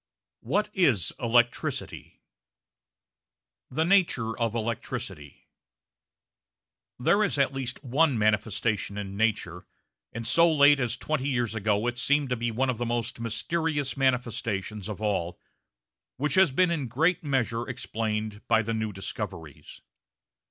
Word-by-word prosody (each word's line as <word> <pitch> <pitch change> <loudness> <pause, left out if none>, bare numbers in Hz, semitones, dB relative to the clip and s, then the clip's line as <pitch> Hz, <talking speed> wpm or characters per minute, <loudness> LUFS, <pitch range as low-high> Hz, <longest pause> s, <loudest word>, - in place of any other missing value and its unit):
WHAT 210 +1 -1
IS 135 - +2
ELECTRICITY? 120 0 0 1.5
The 160 +5 0
Nature 165 - +2
of 115 -2 -1
Electricity 110 -10 -5 1.5
There 200 +12 +3
is 200 - 0
at 140 -1 +2
least 135 -2 -5
one 140 +1 +2
manifestation 105 0 0
in 100 -1 -5
nature, 100 -5 -1 0.4
and 115 0 -6
so 165 +8 +5
late 145 -2 +6
as 125 -2 -1
twenty 145 -1 -2
years 120 -4 0
ago 105 0 0
it 120 0 -2
seemed 145 +1 +2
to 125 - +1
be 120 0 -2
one 130 +3 0
of 120 - -7
the 120 - -1
most 120 0 -2
mysterious 145 +5 -2
manifestations 115 -6 -1
of 105 0 -6
all, 95 -5 -1 0.8
which 145 +2 0
has 190 -4 +5
been 180 +6 +3
in 150 -6 -1
great 160 +10 +1
measure 120 -5 -1
explained 110 -3 -3
by 115 -1 +3
the 115 +2 -2
new 110 -1 -2
discoveries. 80 -5 -7
120 Hz, 130 wpm, -27 LUFS, 110-140 Hz, 1.5 s, late